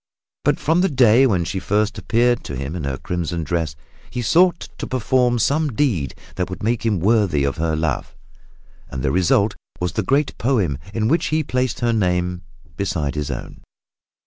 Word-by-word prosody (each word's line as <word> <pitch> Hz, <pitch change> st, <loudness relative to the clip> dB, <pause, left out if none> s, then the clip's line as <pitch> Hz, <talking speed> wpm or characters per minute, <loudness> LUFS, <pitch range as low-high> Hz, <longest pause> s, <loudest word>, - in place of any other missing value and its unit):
But -, -, +2 dB
from 165 Hz, +4 st, +2 dB
the 190 Hz, -, +2 dB
day 130 Hz, -2 st, +5 dB
when 90 Hz, -7 st, +1 dB
she 95 Hz, -, -3 dB
first 105 Hz, +3 st, 0 dB
appeared 120 Hz, +2 st, +2 dB
to 70 Hz, -, -5 dB
him 70 Hz, +5 st, -4 dB
in 80 Hz, -5 st, -4 dB
her 70 Hz, -1 st, -2 dB
crimson 85 Hz, 0 st, -3 dB
dress, 80 Hz, -1 st, -2 dB, 0.3 s
he 125 Hz, -, -4 dB
sought 175 Hz, +8 st, +3 dB
to -, -, -4 dB
perform 125 Hz, 0 st, +1 dB
some 145 Hz, +4 st, +1 dB
deed 100 Hz, -, 0 dB, 0.2 s
that 90 Hz, 0 st, -1 dB
would 90 Hz, +1 st, -7 dB
make 115 Hz, +2 st, 0 dB
him 110 Hz, -5 st, +1 dB
worthy 100 Hz, -7 st, +2 dB
of 70 Hz, +1 st, -1 dB
her 80 Hz, 0 st, 0 dB
love, 80 Hz, -3 st, -2 dB, 0.7 s
and 65 Hz, -, -5 dB
the 70 Hz, -, +1 dB
result 95 Hz, +4 st, +2 dB, 0.2 s
was 90 Hz, -1 st, -1 dB
the 100 Hz, -, -1 dB
great 135 Hz, +7 st, +1 dB
poem 105 Hz, -, +1 dB
in 110 Hz, 0 st, 0 dB
which 165 Hz, +8 st, +2 dB
he 155 Hz, 0 st, +1 dB
placed 125 Hz, -3 st, -1 dB
her 120 Hz, -1 st, +2 dB
name 90 Hz, -3 st, 0 dB, 0.4 s
beside 80 Hz, -7 st, -1 dB
his 75 Hz, -1 st, -3 dB
own. 65 Hz, -, -6 dB
100 Hz, 185 wpm, -21 LUFS, 85-125 Hz, 0.7 s, day